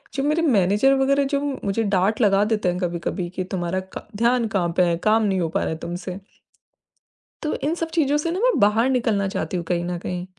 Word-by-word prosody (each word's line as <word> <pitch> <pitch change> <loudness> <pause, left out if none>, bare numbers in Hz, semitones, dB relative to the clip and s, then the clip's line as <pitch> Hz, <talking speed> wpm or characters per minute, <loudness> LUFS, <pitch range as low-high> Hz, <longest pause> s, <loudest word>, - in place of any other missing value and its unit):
जो 270 - -1
मेरे 305 +3 +1
मैनेजर 210 - +3
वगैरह 275 +1 +3
जो 280 - +2 0.3
मुझे 200 +3 0
डाँट 200 +3 +1
लगा 200 -1 +4
देते 210 -4 0
हैं 180 - -2
कभी-कभी 175 0 -3
कि, 185 +1 -4
"तुम्हारा 180 0 -2 0.2
क - - -11
ध्यान 235 0 +2
कहाँ 190 -5 0
पे 180 - +5
है? 170 -1 +2
काम 215 +5 +2
नहीं 195 -3 +1
हो 165 - -1
पा - - -1
रहा - - -1
है 160 - -3
तुमसे।" 180 +2 -6 1.2
तो 305 - -1
इन 300 +3 +1
सब 330 -1 -3
चीज़ों 295 -3 +2
से 330 +3 -2
ना 365 - -2
मैं - - +3
बाहर 220 +5 +3
निकलना 225 -6 +1
चाहती 195 -1 -3
हूँ 175 - -3
कहीं 175 0 -1
न 175 0 -3
कहीं। 180 0 -4
205 Hz, 225 wpm, -22 LUFS, 180-260 Hz, 1.2 s, पे